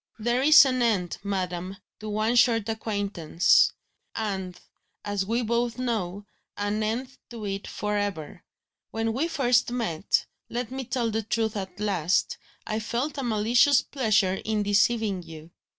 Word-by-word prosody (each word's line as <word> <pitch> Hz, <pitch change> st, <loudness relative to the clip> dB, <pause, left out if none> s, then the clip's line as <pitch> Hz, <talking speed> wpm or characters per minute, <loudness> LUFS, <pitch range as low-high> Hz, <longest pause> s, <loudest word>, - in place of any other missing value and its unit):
"There 240 Hz, +3 st, 0 dB
is 285 Hz, 0 st, +8 dB
an 255 Hz, -1 st, 0 dB
end, 200 Hz, -7 st, 0 dB
madam, 185 Hz, -1 st, -3 dB, 0.2 s
to 215 Hz, -, -6 dB
one 215 Hz, +3 st, 0 dB
short 230 Hz, -2 st, +4 dB
acquaintance; 200 Hz, -7 st, +2 dB, 0.4 s
and, 190 Hz, -4 st, -4 dB, 0.5 s
as 205 Hz, -2 st, -2 dB
we 235 Hz, +3 st, 0 dB
both 235 Hz, +1 st, -1 dB
know, 205 Hz, -6 st, -3 dB, 0.3 s
an 205 Hz, +1 st, -1 dB
end 245 Hz, +5 st, -3 dB
to 230 Hz, -3 st, -7 dB
it 195 Hz, 0 st, -4 dB
for 210 Hz, 0 st, -3 dB
ever. 195 Hz, -7 st, -4 dB, 0.5 s
When 225 Hz, 0 st, -2 dB
we 280 Hz, +8 st, 0 dB
first 250 Hz, -7 st, +2 dB
met 215 Hz, -9 st, 0 dB, 0.2 s
let 240 Hz, 0 st, -4 dB
me 265 Hz, 0 st, -4 dB
tell 235 Hz, -2 st, -1 dB
the 220 Hz, +1 st, -1 dB
truth 220 Hz, 0 st, -1 dB
at 190 Hz, -2 st, -6 dB
last! 180 Hz, -5 st, 0 dB, 0.3 s
I 215 Hz, 0 st, -2 dB
felt 250 Hz, +7 st, -3 dB
a -, -, -2 dB
malicious 235 Hz, +4 st, +3 dB
pleasure 215 Hz, -8 st, +1 dB
in 215 Hz, -1 st, 0 dB
deceiving 205 Hz, -1 st, +2 dB
you. 165 Hz, -1 st, -12 dB
215 Hz, 150 wpm, -26 LUFS, 195-240 Hz, 0.5 s, is